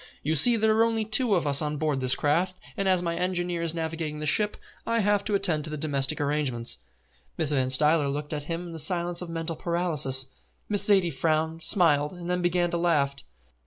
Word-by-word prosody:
"You 155 - 0
see 235 - +6
there 220 -1 +2
are 225 - +4
only 225 -1 0
two 220 0 +4
of 170 - -1
us 140 -1 +4
on 150 0 -3
board 150 -2 -1
this 130 0 +4
craft, 175 +5 -1 0.2
and 195 -1 -1
as 185 -1 +2
my 170 -1 -2
engineer 175 -1 -2
is 165 0 -2
navigating 160 -2 -4
the 150 - -5
ship, 210 +7 +1 0.3
I 230 - -1
have 205 0 +1
to 210 - -1
attend 160 -6 +2
to - - -7
the 155 - -5
domestic 140 -3 -1
arrangements." 140 -5 -1 0.6
Mrs. 155 -2 +3
Van 130 -3 0
Stuyler 150 +2 +2
looked 145 +2 -4
at 145 -1 -4
him 170 +2 -4
in 170 - -9
the 165 - -7
silence 175 +2 -1
of 180 - -7
mental 165 0 -3
paralysis. 155 -7 0 0.4
Miss 205 -1 +2
Zaidie 190 -5 +3
frowned, 160 +3 -1
smiled, 160 -5 +2
and 175 0 -6
then 180 0 -1
began 175 0 0
to 170 - -1
laugh. 155 -5 +1
165 Hz, 215 wpm, -26 LUFS, 150-180 Hz, 0.6 s, see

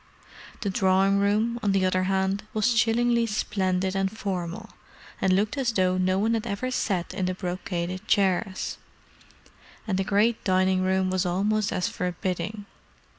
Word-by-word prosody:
The 200 - -1
drawing 190 +1 +3
room, 215 +4 +1
on 200 -2 +1
the 190 -1 +2
other 185 0 +1
hand, 190 +1 0
was 215 +3 +2
chillingly 235 +1 +2
splendid 190 -3 -1
and 195 0 +1
formal, 200 0 -4 0.5
and 190 - +3
looked 210 +8 +1
as 250 -3 +1
though 185 -3 +2
no 185 +1 +2
one 220 +3 +1
had 225 0 -1
ever 225 +5 -3
sat 185 -8 -1
in 185 -1 -1
the 185 - -2
brocaded 180 +1 -4
chairs: 190 -1 0 1.1
and 190 -3 0
the - - +2
great 210 +4 +1
dining 185 0 +2
room 185 0 +1
was 185 0 +1
almost 200 +4 0
as 180 - 0
forbidding. 180 +3 -3
195 Hz, 155 wpm, -26 LUFS, 185-215 Hz, 1.1 s, drawing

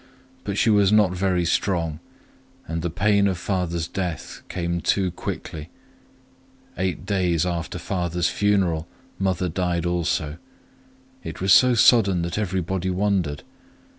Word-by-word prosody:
But 100 -1 -3
she 115 - +3
was 100 -2 +4
not 105 -3 +4
very 90 -1 0
strong, 85 -3 0 0.7
and 80 0 -3
the 85 - -2
pain 100 +3 +2
of 95 -2 -1
father's 85 -3 -2
death 90 -4 -5
came 85 -1 -2
too 95 0 +1
quickly. 80 -1 -6 1.1
Eight 90 -3 -2
days 90 -4 +1
after 85 -3 -3
father's 90 -1 -1
funeral 95 -6 +1 0.3
mother 95 -1 0 0.4
also 85 -3 0
died. 80 - -11 0.8
It - - -7
was 95 0 +4
so 125 -1 +6
sudden 100 -7 +5
that 85 +5 -3
everybody 95 -2 -2
wondered. 90 -6 0
90 Hz, 130 wpm, -23 LUFS, 85-100 Hz, 1.1 s, so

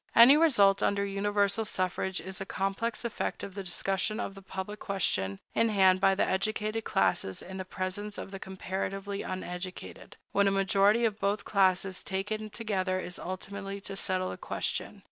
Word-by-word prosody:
Any 240 +5 +10
result 220 -12 +5
under 200 0 +1
universal 200 +1 +1
suffrage 185 -2 -1
is 190 0 -6
a - - 0
complex 200 +5 -2
effect 235 - -3
of 195 - -6
the 200 - -5
discussion 195 +3 0
of 200 - -3
the 195 - -11
public 195 +2 -6
question 100 - 0 0.2
in 230 - +3
hand 190 -3 +4
by 195 0 +5
the - - +2
educated 215 +3 -1
classes 95 - +1
in 190 +1 -8
the 185 - -4
presence 190 +3 -4
of - - -7
the 195 - -6
comparatively 195 +1 -4
uneducated, 185 0 -6
when 200 0 +3
a - - +3
majority 200 +4 +4
of 215 -2 -1
both 200 +1 0
classes 190 -1 +2
taken 215 +3 -3
together 195 -4 -1
is 180 -1 -5
ultimately 195 +2 -5
to 195 0 -5
settle 185 -1 0
the - - -6
question. - - -3
195 Hz, 170 wpm, -30 LUFS, 190-205 Hz, 0.2 s, Any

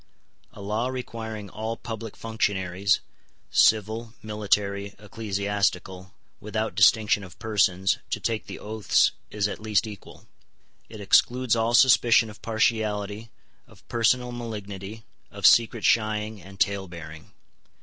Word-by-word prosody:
A 105 - -11
law 110 +4 -1
requiring 115 -5 -6
all 110 +2 -4
public 115 -2 -7
functionaries, 100 -3 0 0.5
civil, 110 +2 +2
military, 100 -1 -1
ecclesiastical, 100 -2 -3 0.2
without 110 +1 -3
distinction 105 0 +4
of 90 -3 -12
persons, 95 -4 +1
to - - -2
take 115 -2 -2
the - - -7
oaths 105 -1 +2 0.2
is 105 -1 -1
at 100 - -6
least 110 0 +1
equal. 105 -3 -11 0.6
It 110 -2 -9
excludes 120 +4 +3
all 115 +1 +1
suspicion 120 -3 +5
of 105 - -16
partiality, 110 -1 -1 0.4
of - - -21
personal 125 +1 +1
malignity, 105 -3 -7 0.3
of - - -5
secret 115 -1 +5
shying 110 -1 +1
and 95 +2 -14
talebearing. 85 -6 -3
105 Hz, 120 wpm, -25 LUFS, 100-115 Hz, 0.6 s, suspicion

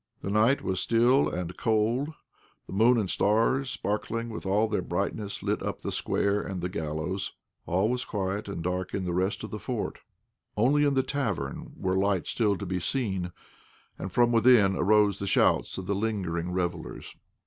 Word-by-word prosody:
The 100 - -2
night 110 +6 +3
was 95 -1 -1
still 120 +6 +3
and 90 0 -4
cold, 115 +5 +1 0.6
the - - -9
moon 115 +5 +5
and 105 -4 0
stars, 115 +8 +2
sparkling 115 0 -2
with 110 - -6
all 105 +3 +3
their 105 -3 -1
brightness, 100 +3 -3
lit - - 0
up - - -4
the - - -2
square 100 +1 0
and 95 -2 -5
the 90 +1 -2
gallows. 80 +3 -3 0.3
All 95 +5 +2
was 125 +1 -1
quiet 100 0 -3
and 95 -4 -5
dark 90 0 -2
in 95 - -2
the 90 - -2
rest 95 +5 0
of 110 - -6
the 105 - -4
fort. 120 -3 -4 0.6
Only 140 +7 +4
in 140 -1 +2
the 130 - +3
tavern 115 - -3
were 95 0 0
lights 95 -3 +1
still 105 -4 +1
to 100 - -5
be 90 0 -2
seen, 95 - -1 0.7
and 95 - -5
from 120 +3 +3
within 115 -4 +5
arose 105 0 +3
the 100 - -3
shouts - - +2
of 95 - -5
the 100 - 0
lingering 95 -5 -2
revellers. 90 -1 -4
100 Hz, 180 wpm, -28 LUFS, 95-115 Hz, 0.7 s, moon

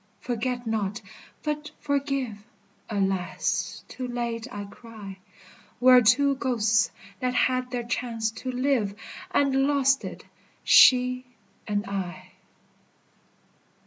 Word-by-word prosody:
Forget 245 +1 -3
not, 210 -3 -1 0.4
but 300 0 -3
forgive! 275 -6 -1 0.5
Alas, 195 -3 -1
too 255 - -6
late 235 -1 -3
I 205 - -5
cry. 200 -2 -11 0.6
We 255 +1 +6
are 250 0 +9
two 275 +5 +4
ghosts 225 -5 +2 0.3
that 250 0 -1
had 255 0 +1
their 245 -1 -3
chance 230 -2 -2
to 240 +3 -5
live, 250 -6 0 0.3
And 270 -1 +2
lost 275 -1 +3
it, - - -8 0.4
she 255 0 +6 0.4
and 205 0 -1
I. 185 -3 -5
245 Hz, 110 wpm, -26 LUFS, 215-260 Hz, 0.6 s, are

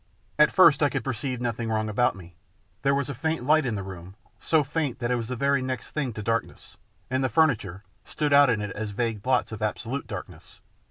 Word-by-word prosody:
At 150 - +6
first 165 -6 +6
I 145 - +4
could 135 -4 -3
perceive 130 0 -3
nothing 115 -1 -2
wrong 110 0 0
about 110 +2 +1
me. 90 -2 -13 0.5
There 140 0 +2
was 140 -1 -1
a 140 - -4
faint 160 +1 -2
light 155 0 +3
in 115 - -1
the 100 - -4
room, 95 0 -9 0.2
so 160 -2 +2
faint 145 -2 -2
that 120 -1 -2
it - - +3
was 115 -2 -3
the 125 - -3
very 140 +1 +1
next 130 0 -4
thing 140 -5 -2
to 105 - -6
darkness, 115 +2 -3 0.4
and 130 +1 +1
the 130 - +1
furniture 110 - +1 0.2
stood 150 -2 -1
out 140 -1 +7
in 115 -3 +1
it 105 -1 -4
as 110 +1 -4
vague 115 -4 -1
blots 125 +1 +1
of 110 -1 -7
absolute 115 +5 -3
darkness. - - -9
125 Hz, 225 wpm, -26 LUFS, 110-140 Hz, 0.5 s, out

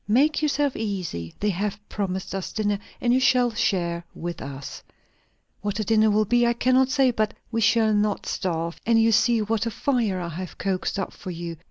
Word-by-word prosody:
"Make 285 +8 +3
yourself 290 -2 +1
easy; 180 - -4
they 210 0 +2
have 200 +2 -2
promised 190 -2 -3
us 195 -1 -4
dinner, 205 -2 0 0.2
and 240 0 +2
you 255 - +4
shall 250 -2 +3
share 175 -5 0
with 175 0 -5
us. 135 0 -7 0.8
What 205 0 -2
the 215 - -1
dinner 220 0 +4
will 215 +1 +3
be, 240 +3 +3
I 235 - +3
cannot 255 +2 +3
say; 265 -2 +3
but 215 -2 -1 0.2
we 230 -1 0
shall 220 0 +4
not 210 0 0
starve; 170 -2 -3
and 230 0 +3
you 225 0 +4
see 230 0 +3
what 225 +1 -1
a - - +1
fire 230 -5 0
I 175 -1 -4
have 180 +2 -7
coaxed 190 0 -2
up 195 - -3
for - - -9
you. 170 -1 -5
210 Hz, 200 wpm, -25 LUFS, 185-235 Hz, 0.8 s, you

